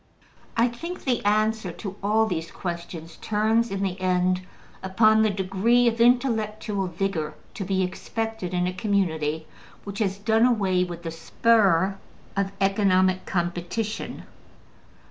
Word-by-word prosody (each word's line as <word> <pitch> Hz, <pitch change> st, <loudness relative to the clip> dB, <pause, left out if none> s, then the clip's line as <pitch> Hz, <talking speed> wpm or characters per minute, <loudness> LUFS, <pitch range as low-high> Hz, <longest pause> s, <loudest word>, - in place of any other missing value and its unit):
I 230 Hz, +1 st, +5 dB
think 335 Hz, +10 st, -6 dB
the 250 Hz, -4 st, 0 dB
answer 215 Hz, -1 st, +1 dB
to 195 Hz, 0 st, -7 dB
all 215 Hz, +3 st, +3 dB
these 165 Hz, -5 st, -3 dB
questions 170 Hz, -2 st, -6 dB
turns, 220 Hz, +2 st, +1 dB
in 195 Hz, 0 st, -2 dB
the 190 Hz, -1 st, -3 dB
end, 185 Hz, 0 st, +2 dB, 0.4 s
upon 215 Hz, +3 st, +4 dB
the 220 Hz, -, +4 dB
degree 200 Hz, +5 st, +2 dB
of 230 Hz, 0 st, +1 dB
intellectual 220 Hz, -5 st, +1 dB
vigor 170 Hz, -3 st, -2 dB, 0.2 s
to 200 Hz, -, -4 dB
be 190 Hz, 0 st, 0 dB
expected 220 Hz, +1 st, -4 dB
in 180 Hz, -1 st, 0 dB
a 180 Hz, -, -1 dB
community 160 Hz, -6 st, 0 dB, 0.4 s
which 200 Hz, +1 st, -6 dB
has 195 Hz, -3 st, 0 dB
done 220 Hz, +3 st, +3 dB
away 195 Hz, -6 st, +2 dB
with 175 Hz, -1 st, -6 dB
the 165 Hz, -, -4 dB
spur 195 Hz, 0 st, +2 dB, 0.4 s
of 195 Hz, 0 st, 0 dB
economic 190 Hz, -2 st, +2 dB
competition. 175 Hz, +5 st, -3 dB
195 Hz, 135 wpm, -25 LUFS, 180-220 Hz, 0.4 s, I